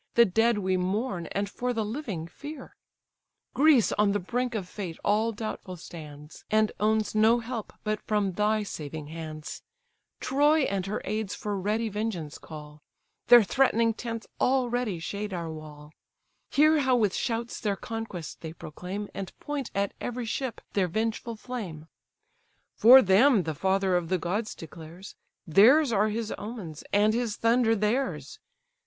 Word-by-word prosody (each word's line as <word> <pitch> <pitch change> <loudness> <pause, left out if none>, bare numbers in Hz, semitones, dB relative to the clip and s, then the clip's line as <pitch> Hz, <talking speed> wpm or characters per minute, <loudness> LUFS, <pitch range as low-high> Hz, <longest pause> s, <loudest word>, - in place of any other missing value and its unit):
The 235 - +7
dead 225 +4 +2
we 190 -2 0
mourn, 185 -1 -2
and 200 0 -2
for 245 +5 -3
the 225 -2 -1
living 215 - -4
fear; 290 - -10 0.8
Greece 285 -5 +5
on 205 -1 +2
the 205 - +1
brink 240 +5 -2
of 195 -5 -3
fate 180 -4 -6
all 215 +3 +2
doubtful 210 -4 -6
stands, 150 -3 -11
And 215 0 +3
owns 215 0 +1
no 220 +2 +5
help 230 -2 -5
but 215 0 -1
from 205 -3 0
thy 210 +3 +1
saving 155 -5 -6
hands: 155 -2 -7 0.6
Troy 295 +4 +3
and 195 -6 -1
her 205 - -3
aids 215 -2 -2
for 210 -1 -3
ready 210 +4 -1
vengeance 205 -8 -4
call; 150 -1 -11 0.5
Their 240 -2 +9
threatening 230 0 +2
tents 230 0 -5
already 245 -6 +1
shade 200 +4 -5
our 170 -2 -4
wall: 150 -1 -10 0.6
Hear 310 +2 +4
how 260 -2 +3
with 210 -5 +2
shouts 235 0 -2
their 205 -2 -1
conquest 225 -6 -6
they 160 -1 -6
proclaim, 180 +6 -6
And 195 -2 -7
point 290 -4 -4
at 200 0 0
every 245 0 -3
ship 255 +2 -3
their 195 -3 +2
vengeful 225 +4 -2
flame! 210 -10 -6 0.9
For 255 +4 +9
them 205 +3 +5
the 160 -1 -3
father 190 +3 +1
of 175 -2 -1
the 185 - +2
gods 200 +6 -2
declares, 165 +3 -10 0.3
Theirs 235 - +6
are 215 0 +2
his 220 +1 -3
omens, 205 -9 -7
and 210 +1 +4
his 230 -2 -1
thunder 230 0 +3
theirs. 225 +6 -1
210 Hz, 155 wpm, -27 LUFS, 180-235 Hz, 0.9 s, Their